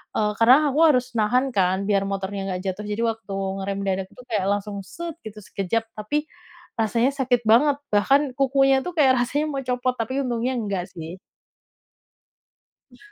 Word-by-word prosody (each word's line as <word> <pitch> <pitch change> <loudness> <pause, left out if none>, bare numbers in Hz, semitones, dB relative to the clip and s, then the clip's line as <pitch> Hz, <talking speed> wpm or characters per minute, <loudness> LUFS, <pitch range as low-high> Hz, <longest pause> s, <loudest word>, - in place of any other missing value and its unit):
eee, 210 -1 +1
karena 235 +3 +7 0.2
aku 290 - -1
harus 255 -4 +3
nahan 250 +5 +2
kan 190 0 +2
biar 200 -1 +2
motornya 195 0 -3
nggak 180 0 -3
jatuh 195 +3 -4
jadi 210 +2 -2
waktu 215 -3 -9 0.3
ngerem 195 0 -3
mendadak 195 -1 -1
tuh 250 - -14
kayak 205 -4 0
langsung 205 0 -4
set 340 - -7
gitu 215 -1 -8
sekejap, 195 +4 -2 0.2
tapi 295 +9 -2 0.5
rasanya 230 +4 +2
sakit 260 -3 +1
banget 275 +6 +5 0.2
bahkan 270 +6 +3
kukunya 270 0 +3
tuh 360 - -4
kayak 265 -3 +5
rasanya 290 +5 -1
mau 275 -1 -3
copot 250 0 0
tapi 260 +5 -1
untungnya 245 +1 -1
enggak 200 -5 -2
sih. 165 +1 -8 1.7
Eh. 245 - -18
230 Hz, 165 wpm, -23 LUFS, 200-265 Hz, 1.7 s, karena